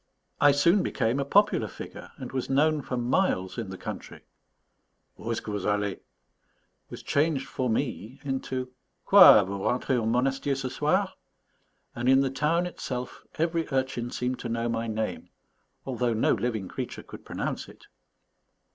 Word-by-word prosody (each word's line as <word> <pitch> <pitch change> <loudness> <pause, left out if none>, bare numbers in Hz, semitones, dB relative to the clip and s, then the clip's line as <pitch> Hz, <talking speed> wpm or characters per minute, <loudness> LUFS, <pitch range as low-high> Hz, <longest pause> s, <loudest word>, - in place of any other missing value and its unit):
I 145 - +7
soon 170 +8 +4
became 120 -3 0
a 140 - 0
popular 205 +8 +3
figure, - - -9
and 130 -4 -7
was 130 -2 -3
known 150 +3 +3
for 125 -1 -4
miles 120 - 0
in 110 -4 -4
the 95 - -7
country. - - -7 1.0
Où'st 115 +1 -2
ce - - -2
que 105 - -6
vous 100 -2 -3
allez? 105 -1 0 0.9
was - - -9
changed 145 -2 +1
for 130 -2 -2
me 120 0 -2
into 130 -2 -3 0.3
Quoi, 185 - +9
vous 100 +1 -4
rentrez 125 +1 +1
au 110 - -1
Monastier 135 +4 +1
ce 130 -1 -3
soir? - - +1 0.8
and 120 +2 -1
in 135 +1 +6
the 135 -1 0
town 155 +6 +1
itself 125 -7 -5 0.2
every 165 0 0
urchin 130 -3 -1
seemed 125 +1 -2
to 120 - -5
know 115 0 -1
my 115 0 -2
name, 110 0 -3 0.6
although 125 -2 0
no 110 - +3
living 110 -3 -2
creature - - -6
could - - -12
pronounce - - -4
it. - - -16
130 Hz, 160 wpm, -27 LUFS, 115-140 Hz, 1.0 s, Quoi